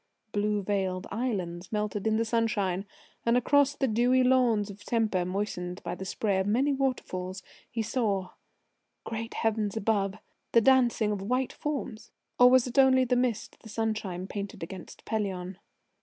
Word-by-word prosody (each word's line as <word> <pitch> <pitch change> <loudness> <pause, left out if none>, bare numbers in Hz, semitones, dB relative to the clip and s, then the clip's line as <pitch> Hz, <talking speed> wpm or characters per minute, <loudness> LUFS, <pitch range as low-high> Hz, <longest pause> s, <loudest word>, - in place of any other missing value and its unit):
Blue 210 0 0
veiled 190 -2 -1
islands 190 -7 -3
melted 210 -1 -1
in 220 0 +2
the 230 - +1
sunshine, 210 -4 0 0.4
and 235 +1 +3
across 285 +3 +3
the 270 - 0
dewy 245 +3 +3
lawns 240 -5 +3
of 200 +1 -13
Tempe, 220 -6 +1
moistened 180 -1 -3
by - - -3
the 190 - -6
spray 195 0 0
of 190 - 0
many 265 +7 +2
waterfalls, 190 -9 -2 0.3
he 225 - -2
saw 205 -5 -1 0.7
Great 225 +1 -5
Heavens 220 -2 0
above! 200 -2 +1 0.4
the 230 - +7
dancing 240 -4 +4
of 205 -2 -2
white 250 +6 -1
forms... 250 -7 -4 0.3
or 250 0 +9
was 255 -1 +5
it 250 +1 0
only 260 -1 +6
mist 245 -3 -1
the 220 - -12
sunshine 215 -5 -2
painted 200 -2 -6
against 180 +1 -9
Pelion?... 190 -4 -3
215 Hz, 155 wpm, -29 LUFS, 195-245 Hz, 0.7 s, or